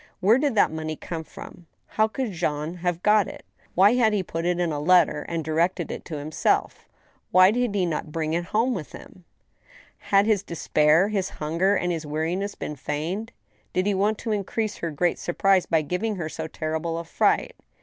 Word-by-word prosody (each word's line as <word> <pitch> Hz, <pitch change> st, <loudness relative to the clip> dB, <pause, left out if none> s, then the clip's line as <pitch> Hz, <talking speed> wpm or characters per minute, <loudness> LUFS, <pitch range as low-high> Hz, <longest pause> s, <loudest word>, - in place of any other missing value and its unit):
Where 215 Hz, +7 st, +4 dB
did 280 Hz, -4 st, 0 dB
that 205 Hz, -, +4 dB
money 155 Hz, 0 st, -4 dB
come 165 Hz, +1 st, -6 dB
from? 170 Hz, +2 st, -12 dB, 0.2 s
How 215 Hz, 0 st, +2 dB
could 245 Hz, 0 st, -3 dB
Jean 160 Hz, -1 st, -2 dB
have 175 Hz, 0 st, -2 dB
got 210 Hz, -1 st, +4 dB
it? -, -, -10 dB, 0.3 s
Why 195 Hz, +5 st, +6 dB
had 230 Hz, -3 st, +3 dB
he 200 Hz, -2 st, 0 dB
put 165 Hz, -1 st, -4 dB
it 175 Hz, 0 st, +1 dB
in 175 Hz, -2 st, 0 dB
a 145 Hz, -, -2 dB
letter 160 Hz, -1 st, +4 dB
and 165 Hz, -1 st, -2 dB
directed 170 Hz, +2 st, 0 dB
it -, -, -7 dB
to 155 Hz, -, -5 dB
himself? 150 Hz, +2 st, -1 dB, 0.4 s
Why 185 Hz, +2 st, +6 dB
did 240 Hz, -2 st, 0 dB
he 190 Hz, -3 st, +2 dB
not 155 Hz, -2 st, -3 dB
bring 160 Hz, 0 st, -2 dB
it 170 Hz, +1 st, -1 dB
home 230 Hz, +7 st, +1 dB
with 165 Hz, -9 st, -6 dB
him? 180 Hz, -, -13 dB, 0.7 s
Had 200 Hz, 0 st, +3 dB
his 215 Hz, -3 st, +2 dB
despair, 165 Hz, 0 st, +2 dB
his 195 Hz, -3 st, -1 dB
hunger, 170 Hz, +6 st, 0 dB
and 180 Hz, -2 st, 0 dB
his 165 Hz, -2 st, -3 dB
weariness 170 Hz, +7 st, -2 dB
been 150 Hz, -, -5 dB
feigned? 165 Hz, -, -4 dB, 0.4 s
Did 185 Hz, -, +1 dB
he 205 Hz, -, +2 dB
want 205 Hz, +3 st, +1 dB
to 225 Hz, -, -4 dB
increase 210 Hz, +1 st, -2 dB
her 170 Hz, -, -3 dB
great 170 Hz, +3 st, 0 dB
surprise 190 Hz, +1 st, +2 dB
by 160 Hz, -2 st, +2 dB
giving 190 Hz, +8 st, -2 dB
her 170 Hz, -4 st, -4 dB
so 160 Hz, 0 st, -5 dB
terrible 160 Hz, +1 st, -3 dB
a 170 Hz, -, -4 dB
fright 165 Hz, -, +1 dB
175 Hz, 200 wpm, -25 LUFS, 160-205 Hz, 0.7 s, Why